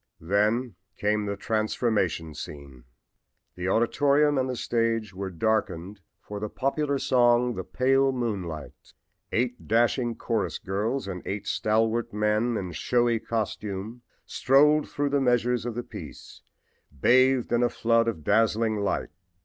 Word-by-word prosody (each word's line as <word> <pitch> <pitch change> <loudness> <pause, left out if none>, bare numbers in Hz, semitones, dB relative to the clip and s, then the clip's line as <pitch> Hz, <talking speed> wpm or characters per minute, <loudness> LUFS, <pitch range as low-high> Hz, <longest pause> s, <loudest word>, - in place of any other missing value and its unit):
Then 105 +6 +1 0.2
came 105 0 0
the 100 0 -3
transformation 105 -7 -1
scene! 70 -5 -10 0.7
The 90 0 -4
auditorium 145 +7 +3
and 130 0 -1
the 125 - -2
stage 115 -3 -1
were 95 +1 -4
darkened 100 0 -1 0.2
for 105 0 -8
the 105 0 -4
popular 140 +3 -1
song 120 -2 +3
"The - - -5
Pale 135 +1 +2
Moonlight." 95 - -5 0.4
Eight 125 +1 -1
dashing 120 +1 +2
chorus 110 -3 -2
girls 105 +7 -2
and 90 -2 -5
eight 100 +1 -4
stalwart 115 +2 0
men 105 +3 +1
in 95 -3 -4
showy 120 +6 +1
costume 110 0 -4 0.2
strolled 150 +3 +3
through 145 0 -1
the 140 0 +1
measures 125 -1 +1
of 120 - -4
the 120 - -3
piece, - - -11 0.6
bathed 130 - +4
in 120 - +3
a 120 - +3
flood 115 0 +2
of 100 -10 -3
dazzling 110 +3 +2
light. 100 -1 -1
115 Hz, 135 wpm, -26 LUFS, 100-125 Hz, 0.7 s, bathed